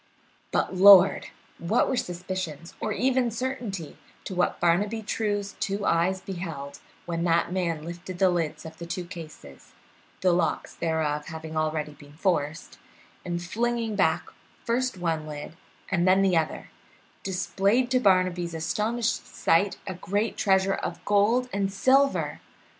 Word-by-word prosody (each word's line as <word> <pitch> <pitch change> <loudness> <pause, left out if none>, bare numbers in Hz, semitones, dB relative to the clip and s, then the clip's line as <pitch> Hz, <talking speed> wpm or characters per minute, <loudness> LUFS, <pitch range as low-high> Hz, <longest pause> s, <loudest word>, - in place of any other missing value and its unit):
But, - - 0
Lord! 195 0 +8 0.3
what 210 +8 +2
were - - 0
suspicions 180 - -4
or 215 - -2
even 255 +2 +1
certainty 230 - -4 0.2
to 195 - -6
what 180 0 0
Barnaby 205 +6 +1
True's 205 -1 -2
two 200 0 -2
eyes 185 +3 +2
beheld 165 -8 -6 0.3
when 170 -1 -2
that 170 0 +2
man 170 -4 -1
lifted 175 +2 -7
the 185 0 +4
lids 165 -3 -2
of 160 0 -10
the 170 - -7
two 175 +1 -4
cases 160 - -11 0.5
the 185 - +4
locks 175 -1 0
thereof 155 -3 -1
having 160 -1 -7
already 155 -1 -1
been 145 0 -16
forced 160 -2 -2 0.4
and, 175 -1 -3
flinging 230 +3 -1
back - - +2 0.4
first 250 -2 0
one 165 -3 -2
lid 150 +1 -7 0.4
and 180 -1 +2
then 190 +1 +5
the 190 -2 +3
other, 160 -1 -1 0.5
displayed 200 +6 0
to 255 - +4
Barnaby's 185 -5 +2
astonished 215 +8 -1
sight 195 +4 +1
a 190 - -4
great 205 +5 -2
treasure 190 0 +2
of 175 - -5
gold 210 +5 +3
and 195 -1 0
silver! 270 +7 +2
185 Hz, 140 wpm, -26 LUFS, 165-205 Hz, 0.5 s, Lord